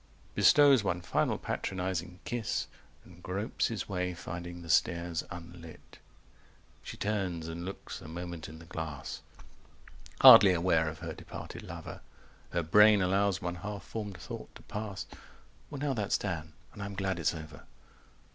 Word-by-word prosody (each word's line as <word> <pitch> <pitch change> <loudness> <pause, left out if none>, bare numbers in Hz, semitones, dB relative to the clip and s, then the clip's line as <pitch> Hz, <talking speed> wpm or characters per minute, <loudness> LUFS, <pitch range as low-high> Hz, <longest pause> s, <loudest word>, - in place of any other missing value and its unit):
Bestows 140 -6 +6
one 90 -3 0
final 85 - 0
patronizing 90 -1 -3
kiss, 120 -2 -2 0.4
And 90 0 -16
gropes 95 +5 -1
his 115 -2 -4
way, 90 -2 -2
finding 85 0 -7
the 85 - -10
stairs 85 0 +1
unlit… 85 -1 -11 0.8
She - - -8
turns 95 -6 -2
and 85 +1 -5
looks 95 +2 -7
a 85 - -10
moment 85 -1 -6
in 80 - -10
the 85 - -13
glass, 80 -3 -6 1.0
Hardly 95 -2 +10
aware 85 -2 +2
of 80 - -8
her - - -4
departed - - -8
lover; - - -8 0.5
250 - - -5
Her 85 - +2
brain 105 +5 +6
allows 95 +1 +1
one 90 0 -2
half 100 +2 -6
formed 105 -4 -6
thought - - -8
to - - -13
pass: 105 -2 -5 0.6
"Well 145 - -6
now 140 0 0
that's 105 -5 0
done: 80 -5 -4 0.2
and 105 - -9
I'm 100 0 -5
glad 95 -2 -1
it's 85 0 +1
over." 80 -2 -10
90 Hz, 155 wpm, -31 LUFS, 85-100 Hz, 1.0 s, Hardly